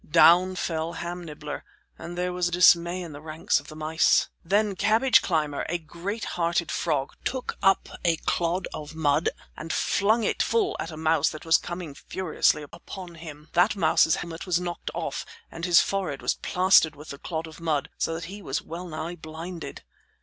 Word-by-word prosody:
Down 175 +3 +6
fell 165 -2 -2
Ham 175 +1 -5
Nibbler, 150 -2 -7 0.3
and 175 +1 -8
there 180 0 -1
was 180 -1 0
dismay 175 0 +4
in 170 - -8
the 145 0 -9
ranks 155 +1 0
of 145 - -15
the 155 - -10
mice. 155 +1 +3
Then 205 +3 +1
Cabbage 220 +6 +4
Climber, 150 -5 0
a 175 - 0
great 175 +7 -5
hearted 170 -1 -1
frog, 145 -4 -1
took 255 -1 -3
up 195 -1 +3 0.2
a 170 -2 +3
clod 175 +3 -1
of 150 +1 -7
mud 155 0 +2 0.3
and 165 +1 -6
flung 220 +3 +2
it - - 0
full 410 -4 +1
at - - -3
a 155 - -8
mouse 160 -1 +2
that 155 - -9
was 165 0 +5
coming 175 -4 -6
furiously 160 -1 0
upon 175 +4 -9
him. 155 -2 -11
That 180 +6 +4
mouse's 160 -3 +4
helmet 170 +1 -6
was 180 -1 +2
knocked 175 -1 -4
off - - -3 0.3
and 165 - -5
his 175 -2 +6
forehead 190 -8 -2
was - - +2
plastered 180 -4 +4
with 150 +2 -12
the 140 - -7
clod 165 -2 -4
of 160 0 -11
mud, 160 -2 -1
so 165 - 0
that 165 - -5
he 200 +4 -8
was 135 -6 -2
well 175 +3 -7
nigh 160 +1 -5
blinded. 165 +2 -8
170 Hz, 185 wpm, -26 LUFS, 155-180 Hz, 0.3 s, Down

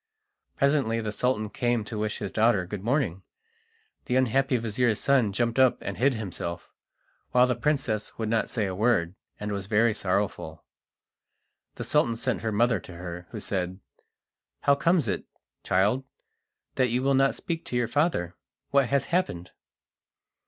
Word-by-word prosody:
Presently 140 -5 +2
the 110 -2 -3
Sultan 110 0 0
came 120 -2 0
to 110 - -7
wish 105 0 -2
his 100 - -5
daughter 110 -4 +3
good 100 +1 -6
morning. 120 - 0 0.8
The 125 - -1
unhappy 130 +1 +2
vizir's 115 0 0
son 130 -7 +3
jumped 115 +4 0
up 130 -2 +5
and - - -5
hid 130 +1 +2
himself, 90 -5 -5 0.6
while 125 0 +6
the 125 - +1
princess 130 -8 -1
would 110 - -2
not 110 0 0
say 110 -4 -1
a 95 - -3
word, 100 -4 +1 0.3
and 105 0 -4
was 100 -2 -4
very 110 +2 +3
sorrowful. 90 -5 -2 1.1
The - - -5
Sultan 115 -1 +2
sent 120 +1 -2
her 110 - -1
mother 115 +3 +2
to 90 - -12
her, 90 0 -7
who 110 - -6
said: 95 -2 -3 0.8
"How 140 - +4
comes 165 -1 +2
it, 95 - -2 0.4
child, 105 +8 +2 0.7
that 130 - +4
you 125 +3 0
will 135 0 +3
not 135 0 +3
speak 165 -1 -4
to - - -4
your 120 -1 +1
father? 145 - 0 0.4
What 140 -2 +4
has 140 +1 +1
happened?" 90 - 0
115 Hz, 160 wpm, -27 LUFS, 100-130 Hz, 1.1 s, while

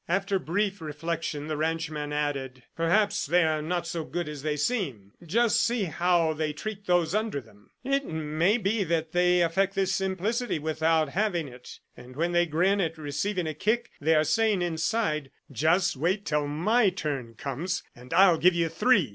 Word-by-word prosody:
After 195 +2 0
brief 195 +3 -1
reflection, 155 0 -4
the 155 0 -3
ranchman 155 -1 -2
added: 135 -4 -3
"Perhaps 200 +4 +1
they 175 +3 +4
are 155 -1 +1
not 175 +3 -2
so 165 -1 -3
good 175 +1 -4
as 150 -2 -6
they 150 0 -1
seem. 145 - -2
Just 225 +7 +2
see 235 -2 +1
how 170 -1 +1
they 155 -1 -2
treat 205 +5 -7
those 175 -2 +2
under 215 -7 0
them! 105 -5 -19
It 275 +1 0
may 160 +6 +1
be 210 -1 0
that 165 -2 -1
they 180 0 +3
affect 195 +4 +1
this 190 -1 +1
simplicity 195 +4 -1
without 160 0 +1
having 180 -2 0
it, 125 -1 -12
and 125 +1 -13
when 170 +4 0
they 175 0 +3
grin 185 +6 +2
at 165 -2 -2
receiving 160 +6 -2
a 155 - -2
kick, 220 +10 -1
they 160 +2 +3
are 155 - +4
saying 215 0 +2
inside, 160 -3 -1 0.2
'Just 160 - +2
wait 180 +9 -1
till 150 -1 0
my 200 +10 +2
turn 140 -10 -4
comes, 150 +8 -3
and 125 +1 -14
I'll 185 -3 +5
give 180 0 +4
you 170 -1 +1
three! 175 - +3
165 Hz, 180 wpm, -27 LUFS, 150-195 Hz, 0.2 s, I'll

